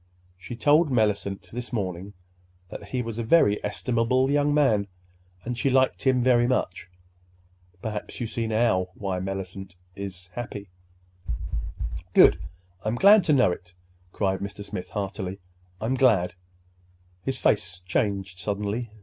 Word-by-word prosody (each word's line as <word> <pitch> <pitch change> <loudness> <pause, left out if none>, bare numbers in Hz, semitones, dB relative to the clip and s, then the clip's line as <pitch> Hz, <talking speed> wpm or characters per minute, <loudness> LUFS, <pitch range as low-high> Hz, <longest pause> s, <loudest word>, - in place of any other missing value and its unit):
She 90 +7 -8
told 145 +7 +4
Mellicent 105 -5 0
this 125 +2 -6
morning 95 -3 -3 0.6
that - - -8
he 125 +5 -2
was 115 0 -5
a - - -1
very 110 -5 +4
estimable 125 +5 +1
young 145 0 +3
man, 125 -9 +3 0.6
and 120 +1 -2
she 135 +3 +1
liked 130 0 +2
him 130 -2 +2
very 120 -1 +4
much. 95 -8 -1 0.9
Perhaps 105 -2 -5
you 120 - -1
see 115 0 -3
now 110 -5 +2
why 95 -2 -3
Mellicent 95 0 -5 0.2
is—happy." 100 +2 -7 1.4
"Good! - - +7 0.4
I'm 110 +2 -1
glad 200 - +7
to 155 - +4
know 125 -9 +4
it," 90 0 -8 0.4
cried 95 -1 0
Mr. 100 +1 -6
Smith 95 -2 -6
heartily. 100 -2 -4 0.4
"I'm 110 +6 -1
glad—" 115 -9 +3 0.9
His 130 -2 -2
face 95 -4 +1
changed 95 -1 -1
suddenly. 105 +4 -2
105 Hz, 130 wpm, -26 LUFS, 95-125 Hz, 1.4 s, Good